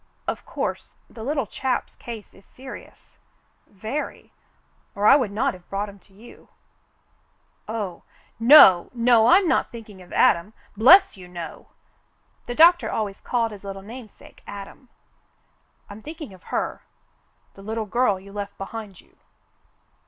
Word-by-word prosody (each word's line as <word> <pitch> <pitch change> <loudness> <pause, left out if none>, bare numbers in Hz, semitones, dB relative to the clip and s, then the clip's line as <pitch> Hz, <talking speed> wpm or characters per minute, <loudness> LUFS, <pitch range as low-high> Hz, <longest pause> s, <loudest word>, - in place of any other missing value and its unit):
"Of - - -4
course - - -5
the 225 - -9
little 280 0 -1
chap's 255 +5 -3
case 230 -3 -9
is 195 - -19
serious 260 +5 -13 0.3
— - - -41 0.2
very 220 +9 -6 0.3
— - - -41
or 205 - -1
I - - +8
would 255 -7 +1
not 205 +2 0
have 180 -1 -16
brought 200 +1 -3
him 200 0 -14
to 195 - -26
you." 230 +4 -16 1.2
"Oh, 210 -5 -5 0.4
no, 230 - +8
no, 235 -1 +4
I'm 370 +4 +5
not - - +1
thinking 215 -5 -11
of 180 - -16
Adam, 170 +6 +2 0.2
bless 250 - +6
you, 180 -1 -12
no." 175 -2 -9 0.8
The 240 - -4
doctor 345 +4 +6
always 205 -3 -3
called 230 -2 -1
his 205 -2 -11
little 195 -1 -7
namesake 225 +1 -13
Adam. 200 +5 -10 1.0
"I'm 205 +2 -11
thinking 305 - -9
of 185 - -18
her - - -3 0.4
— - - -41
the 195 - -14
little 220 +2 -4
girl 210 -2 +1
you 195 +1 -14
left 205 -1 -6
behind 200 -1 -8
you. - - -30
215 Hz, 150 wpm, -23 LUFS, 195-245 Hz, 1.2 s, I